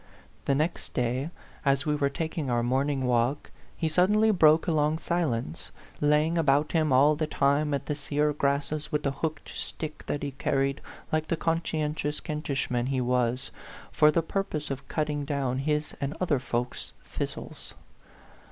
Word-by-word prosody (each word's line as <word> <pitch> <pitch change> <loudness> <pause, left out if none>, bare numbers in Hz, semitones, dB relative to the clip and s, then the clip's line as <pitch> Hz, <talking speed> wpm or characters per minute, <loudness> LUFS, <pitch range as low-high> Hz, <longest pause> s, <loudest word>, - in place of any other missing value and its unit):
The 140 - +2
next 155 +5 -2
day, 125 +4 0 0.3
as 140 +1 +2
we 150 - +1
were 140 -1 +1
taking 160 0 -3
our 120 -1 +1
morning 135 +2 +1
walk, 125 +3 +1 0.3
he 165 - 0
suddenly 210 +7 +4
broke 160 -4 +5
a 170 - +1
long 155 0 +2
silence, 135 - -2 0.3
laying 150 +3 +3
about 145 -1 +3
him 155 -3 +2
all 140 +4 +6
the 155 +1 -1
time 145 +1 +2
at 140 - -1
the 150 - -1
sear 150 +1 0
grasses 145 +1 -1
with 150 - 0
the 140 - +1
hooked 155 +2 -4
stick 155 -1 -5
that 145 - -2
he 140 - -2
carried, 135 +1 0 0.3
like 155 0 0
the 170 - 0
conscientious 155 -2 -1
Kent 150 0 -5
ishman 125 -3 0
he 135 -1 0
was, 125 +1 0 0.4
for 150 - +5
the 165 +2 +2
purpose 160 -5 -2
of 135 0 -5
cutting 150 -1 -1
down 135 -3 -1
his 150 +2 -1
and 140 +3 -2
other 160 -7 +2
folks' 125 0 -3
thistles. - - -6
150 Hz, 165 wpm, -28 LUFS, 135-155 Hz, 0.4 s, all